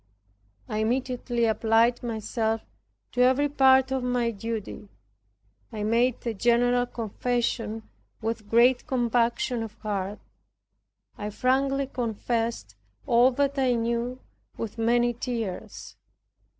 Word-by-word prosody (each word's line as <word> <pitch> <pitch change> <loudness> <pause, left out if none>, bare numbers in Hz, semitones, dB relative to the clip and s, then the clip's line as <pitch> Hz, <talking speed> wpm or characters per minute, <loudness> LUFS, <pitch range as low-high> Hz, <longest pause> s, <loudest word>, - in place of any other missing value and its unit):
I 215 - -2
immediately 240 +1 0
applied 225 +2 +3
myself 225 -1 -2 0.5
to 250 - 0
every 260 +3 +4
part 265 -2 +4
of 265 -1 0
my 245 -1 0
duty. 220 -1 -6 0.8
I 210 -1 -4
made 235 +4 +1
a 230 - -1
general 245 +3 +2
confession 230 -1 -2 0.3
with 220 -2 -4
great 240 +3 +4
compunction 240 -1 +1
of 220 -2 -6
heart. 205 -2 -3 1.0
I 210 - -3
frankly 270 +5 +1
confessed 230 - -3 0.3
all 240 +2 +5
that 280 +1 0
I 255 -2 +3
knew 235 +2 -1 0.4
with 230 0 -5
many 240 +1 +2
tears. 230 -5 -5
235 Hz, 110 wpm, -26 LUFS, 225-250 Hz, 1.0 s, all